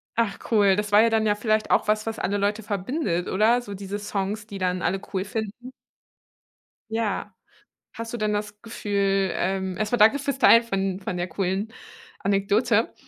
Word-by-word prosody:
Ach 225 Hz, -4 st, 0 dB
cool, 200 Hz, -3 st, +5 dB
das 210 Hz, +1 st, -2 dB
war 205 Hz, +1 st, +7 dB
ja 230 Hz, -, +4 dB
dann 220 Hz, -1 st, +2 dB
ja 205 Hz, -, +3 dB
vielleicht 215 Hz, 0 st, 0 dB
auch -, -, +3 dB
was, 215 Hz, 0 st, +1 dB
was 225 Hz, -, -3 dB
alle 200 Hz, +2 st, -1 dB
Leute 205 Hz, +2 st, -1 dB
verbindet, 200 Hz, -, -2 dB
oder? 220 Hz, +5 st, +3 dB
So 205 Hz, -4 st, -8 dB
diese 200 Hz, +1 st, -5 dB
Songs, 205 Hz, +1 st, -3 dB
die 200 Hz, -, -7 dB
dann 185 Hz, -1 st, -1 dB
alle 190 Hz, +3 st, 0 dB
cool 190 Hz, -1 st, 0 dB
finden. 220 Hz, +4 st, -5 dB, 1.2 s
Ja, 215 Hz, -2 st, -2 dB, 0.6 s
hast 230 Hz, -1 st, -6 dB
du -, -, -2 dB
denn 215 Hz, -2 st, -1 dB
das 210 Hz, 0 st, -4 dB
Gefühl 200 Hz, -4 st, 0 dB
ähm, 190 Hz, -1 st, -1 dB
erst 210 Hz, +2 st, -2 dB
mal 240 Hz, -, +2 dB
danke 220 Hz, +6 st, +6 dB
fürs 280 Hz, -1 st, -3 dB
Teilen 230 Hz, -3 st, +7 dB
von 195 Hz, -4 st, -2 dB
von 185 Hz, -1 st, -4 dB
der 175 Hz, 0 st, -2 dB
coolen 190 Hz, +5 st, -2 dB, 0.5 s
Anekdote 205 Hz, +4 st, +1 dB
205 Hz, 185 wpm, -24 LUFS, 195-225 Hz, 1.2 s, war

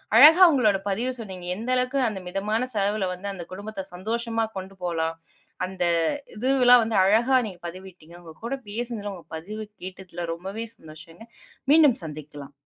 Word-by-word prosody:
அழகா 315 Hz, +9 st, +9 dB
உங்களோட 220 Hz, -9 st, +3 dB
பதிவ 230 Hz, +6 st, -1 dB
சொன்னீங்க. 190 Hz, -5 st, -8 dB
எந்த 230 Hz, +5 st, -6 dB
அளவுக்கு 255 Hz, +2 st, 0 dB
அந்த 205 Hz, -3 st, -3 dB
மிதமான 215 Hz, +7 st, -1 dB
செலவுல 205 Hz, -1 st, 0 dB
வந்து 180 Hz, +3 st, -7 dB
அந்த 180 Hz, -3 st, -7 dB
குடும்பத்த 200 Hz, +1 st, -6 dB
சந்தோஷமா 225 Hz, +4 st, -1 dB
கொண்டு 190 Hz, +1 st, -7 dB
போலாம். 165 Hz, -2 st, -1 dB, 0.5 s
அந்த 185 Hz, -1 st, -4 dB, 0.5 s
இதுவெல்லாம் 250 Hz, 0 st, +5 dB
வந்து 220 Hz, -2 st, -1 dB
அழகா 235 Hz, +7 st, +4 dB
நீங்க 180 Hz, -3 st, -10 dB
பதிவிட்டீங்க. 180 Hz, -2 st, -11 dB
உங்க 165 Hz, -2 st, -12 dB
கூட 270 Hz, +3 st, -2 dB
பேசுனதுல, 220 Hz, -2 st, -4 dB
உங்க 170 Hz, -4 st, -13 dB
பதிவு 215 Hz, +6 st, -7 dB, 0.2 s
கேட்டதுல 180 Hz, -2 st, -7 dB
ரொம்பவே 195 Hz, +6 st, -6 dB
சந்தோஷங்க. 160 Hz, +6 st, -13 dB, 0.5 s
மீண்டும் 300 Hz, -5 st, +6 dB
சந்திக்கலாம். 145 Hz, -2 st, -9 dB
200 Hz, 145 wpm, -25 LUFS, 180-230 Hz, 0.5 s, அழகா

